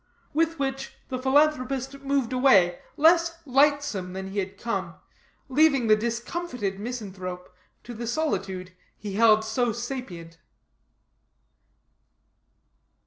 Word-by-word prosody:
With 330 Hz, +2 st, +1 dB
which 270 Hz, -1 st, -3 dB
the 255 Hz, -1 st, -3 dB
philanthropist 270 Hz, -1 st, +1 dB
moved 275 Hz, -3 st, 0 dB
away 195 Hz, -10 st, +4 dB, 0.2 s
less 335 Hz, +2 st, +4 dB
lightsome 275 Hz, -9 st, +2 dB
than 190 Hz, 0 st, -5 dB
he 200 Hz, -, -2 dB
had 190 Hz, 0 st, -4 dB
come, 190 Hz, -6 st, -3 dB, 0.5 s
leaving 280 Hz, -2 st, +3 dB
the 215 Hz, -1 st, +6 dB
discomfited 235 Hz, -, -3 dB
misanthrope 190 Hz, -6 st, -6 dB, 0.3 s
to 240 Hz, -, -8 dB
the 235 Hz, +1 st, -6 dB
solitude 195 Hz, -10 st, -2 dB, 0.3 s
he 205 Hz, -1 st, -6 dB
held 220 Hz, 0 st, +5 dB
so 235 Hz, +2 st, 0 dB
sapient. 210 Hz, -9 st, -7 dB
240 Hz, 105 wpm, -26 LUFS, 195-275 Hz, 0.5 s, the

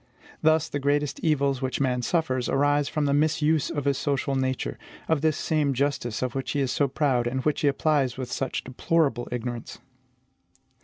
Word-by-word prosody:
Thus, 160 Hz, 0 st, +3 dB
the 145 Hz, -, -3 dB
greatest 145 Hz, 0 st, 0 dB
evils 140 Hz, -4 st, +1 dB
which 130 Hz, -1 st, -2 dB
man 125 Hz, -2 st, +1 dB
suffers 130 Hz, -3 st, 0 dB
arise 145 Hz, +1 st, +2 dB
from 150 Hz, -1 st, -1 dB
the 140 Hz, -, +2 dB
misuse 155 Hz, 0 st, +2 dB
of 145 Hz, -3 st, -3 dB
his 140 Hz, -2 st, +1 dB
social 140 Hz, -1 st, -1 dB
nature, 130 Hz, -1 st, -2 dB, 0.3 s
of 160 Hz, -3 st, +1 dB
this 155 Hz, -1 st, +2 dB
same 150 Hz, -4 st, 0 dB
justice 130 Hz, -4 st, -1 dB
of 125 Hz, -2 st, -2 dB
which 135 Hz, -1 st, -3 dB
he 145 Hz, -, 0 dB
is 135 Hz, -2 st, 0 dB
so 140 Hz, -, +2 dB
proud, 130 Hz, -3 st, +1 dB
and 130 Hz, +1 st, -2 dB
which 150 Hz, -2 st, +1 dB
he 145 Hz, -, +2 dB
applies 140 Hz, -3 st, +1 dB
with 130 Hz, -2 st, -5 dB
such 130 Hz, 0 st, -2 dB
deplorable 130 Hz, -1 st, 0 dB
ignorance. 120 Hz, -1 st, -5 dB
140 Hz, 185 wpm, -26 LUFS, 130-150 Hz, 0.3 s, Thus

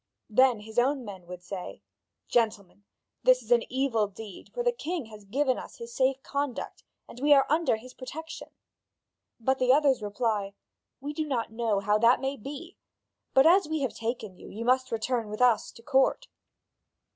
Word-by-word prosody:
Then 250 Hz, -1 st, +4 dB
his 220 Hz, +2 st, -2 dB
own 265 Hz, +1 st, +1 dB
men 190 Hz, -4 st, -9 dB
say: 180 Hz, -, -7 dB, 0.4 s
"Gentlemen, 205 Hz, -4 st, -1 dB, 0.4 s
this -, -, +4 dB
is -, -, -13 dB
an 485 Hz, -, +3 dB
evil 250 Hz, -5 st, +1 dB
deed; 205 Hz, -1 st, -11 dB
for -, -, -3 dB
the 485 Hz, -, +3 dB
king 355 Hz, -, -4 dB
has 215 Hz, -2 st, -13 dB
given 260 Hz, +5 st, 0 dB
us -, -, -10 dB
his 465 Hz, 0 st, -9 dB
safe 265 Hz, -, +1 dB
conduct, 280 Hz, -3 st, -4 dB, 0.2 s
and 245 Hz, -, -11 dB
we 290 Hz, +2 st, +6 dB
are 270 Hz, -1 st, +5 dB
under 315 Hz, -5 st, +3 dB
his 250 Hz, +3 st, -11 dB
protection." 320 Hz, +5 st, -8 dB, 0.9 s
But 265 Hz, +3 st, +1 dB
the 255 Hz, 0 st, +4 dB
others 275 Hz, -3 st, +4 dB
reply: 205 Hz, -1 st, -2 dB, 0.5 s
"We 290 Hz, +2 st, -4 dB
do 310 Hz, 0 st, -2 dB
not 240 Hz, -6 st, -2 dB
know 220 Hz, -3 st, 0 dB
how 210 Hz, +1 st, +2 dB
that 235 Hz, +3 st, +5 dB
may 270 Hz, +1 st, -2 dB
be; 290 Hz, -, -9 dB, 0.6 s
but 265 Hz, +1 st, +7 dB
as 355 Hz, +1 st, +6 dB
we 315 Hz, -1 st, -1 dB
have 265 Hz, -, -1 dB
taken 225 Hz, -3 st, -4 dB
you, -, -, -12 dB
you 225 Hz, +3 st, -6 dB
must 255 Hz, +1 st, +2 dB
return 230 Hz, 0 st, -1 dB
with 215 Hz, -, -6 dB
us 245 Hz, -4 st, +3 dB
to 230 Hz, -, -15 dB
court." 270 Hz, -, +2 dB
255 Hz, 180 wpm, -28 LUFS, 220-285 Hz, 0.9 s, but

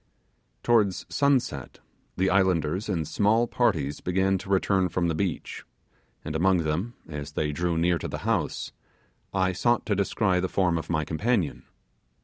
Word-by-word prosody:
Towards 105 Hz, -6 st, +2 dB
sunset 130 Hz, -, 0 dB, 0.4 s
the 95 Hz, +1 st, +2 dB
islanders 95 Hz, 0 st, +1 dB
in 85 Hz, -5 st, -1 dB
small 105 Hz, +8 st, +2 dB
parties 80 Hz, -, 0 dB
began 95 Hz, +1 st, +1 dB
to 95 Hz, -, -10 dB
return 95 Hz, -1 st, +2 dB
from 85 Hz, 0 st, 0 dB
the -, -, 0 dB
beach, 85 Hz, 0 st, -3 dB, 0.6 s
and 80 Hz, -, -4 dB
among 90 Hz, +1 st, +3 dB
them, 90 Hz, +10 st, -2 dB
as 75 Hz, -2 st, -7 dB
they 75 Hz, 0 st, -1 dB
drew 85 Hz, +2 st, -1 dB
near 85 Hz, +1 st, +2 dB
to -, -, -4 dB
the -, -, -4 dB
house, -, -, -1 dB, 0.6 s
I 95 Hz, -1 st, +1 dB
sought 120 Hz, +6 st, +1 dB
to 105 Hz, -, 0 dB
descry 95 Hz, -1 st, +1 dB
the 95 Hz, 0 st, -1 dB
form 90 Hz, -4 st, +1 dB
of -, -, -9 dB
my 80 Hz, -3 st, 0 dB
companion. 95 Hz, -, -1 dB
90 Hz, 155 wpm, -26 LUFS, 80-100 Hz, 0.6 s, among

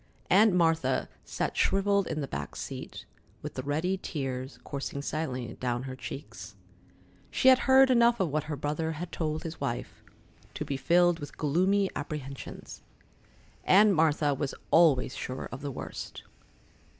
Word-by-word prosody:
Aunt 210 Hz, +3 st, +6 dB
Martha 165 Hz, -6 st, +2 dB, 0.2 s
sat -, -, -3 dB
shrivelled 200 Hz, 0 st, +2 dB
in 155 Hz, -, -2 dB
the 140 Hz, -, -3 dB
back -, -, -5 dB
seat, -, -, -7 dB, 0.4 s
with -, -, -5 dB
the -, -, -4 dB
ready 160 Hz, +8 st, -1 dB
tears 130 Hz, -3 st, -4 dB
coursing 140 Hz, 0 st, -5 dB
silently 130 Hz, -6 st, -3 dB
down 120 Hz, -1 st, -1 dB
her 130 Hz, -1 st, -6 dB
cheeks. 135 Hz, +2 st, -8 dB, 0.7 s
She 260 Hz, -, +4 dB
had 260 Hz, -1 st, +7 dB
heard 265 Hz, 0 st, +7 dB
enough 235 Hz, -1 st, +4 dB
of 185 Hz, -, +1 dB
what 150 Hz, 0 st, -1 dB
her 150 Hz, -1 st, -3 dB
brother 150 Hz, +3 st, -2 dB
had 165 Hz, +3 st, -6 dB
told 155 Hz, -1 st, -2 dB
his 165 Hz, 0 st, -7 dB
wife, 120 Hz, -, -4 dB, 0.5 s
to -, -, -3 dB
be 140 Hz, -, -2 dB
filled 175 Hz, +4 st, +3 dB
with 145 Hz, -, -9 dB
gloomy 185 Hz, +7 st, +2 dB
apprehensions. 145 Hz, -2 st, -7 dB, 0.8 s
Aunt 205 Hz, +2 st, +6 dB
Martha 155 Hz, -3 st, +2 dB
was 135 Hz, 0 st, -3 dB, 0.2 s
always 145 Hz, -7 st, +4 dB
sure 130 Hz, +1 st, -5 dB
of 125 Hz, -, -7 dB
the 145 Hz, -, -4 dB
worst. 130 Hz, -, -7 dB
155 Hz, 150 wpm, -29 LUFS, 135-180 Hz, 0.8 s, had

